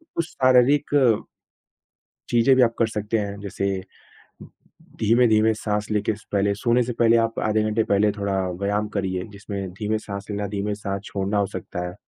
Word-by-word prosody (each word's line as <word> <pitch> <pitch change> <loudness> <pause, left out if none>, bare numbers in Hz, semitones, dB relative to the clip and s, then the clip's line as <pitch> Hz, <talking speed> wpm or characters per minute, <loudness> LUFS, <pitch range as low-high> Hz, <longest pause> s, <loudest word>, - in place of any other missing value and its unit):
कुछ 170 - 0
शारीरिक 130 +3 +3 1.4
चीज़ें 120 +3 +4
भी 130 - +4
आप 115 -2 +4
कर 115 - +3
सकते 105 0 -2
हैं 100 -1 -4
जैसे 100 -1 -4 1.4
धीमे-धीमे 110 -1 +4
साँस 105 -1 -3
लेके 105 +1 0
स 110 - -18
पहले 100 0 +2
सोने 120 +4 +2
से 120 - -3
पहले 115 0 +4
आप 115 0 -1
आधे 110 0 +2
घंटे 110 +1 +1
पहले 100 +1 +2
थोड़ा 100 -1 -3 0.3
व्यायाम 105 +1 0
करिए, 95 -3 -2
जिसमें 100 -1 -6
धीमे 105 +2 -1
साँस 100 -2 -7
लेना, 100 0 -2
धीमे 105 0 -2
साँस 100 -1 -4
छोड़ना 100 +1 -2
हो 100 - +2
सकता 90 -2 -6
है। 90 - -7
105 Hz, 170 wpm, -23 LUFS, 100-115 Hz, 1.4 s, चीज़ें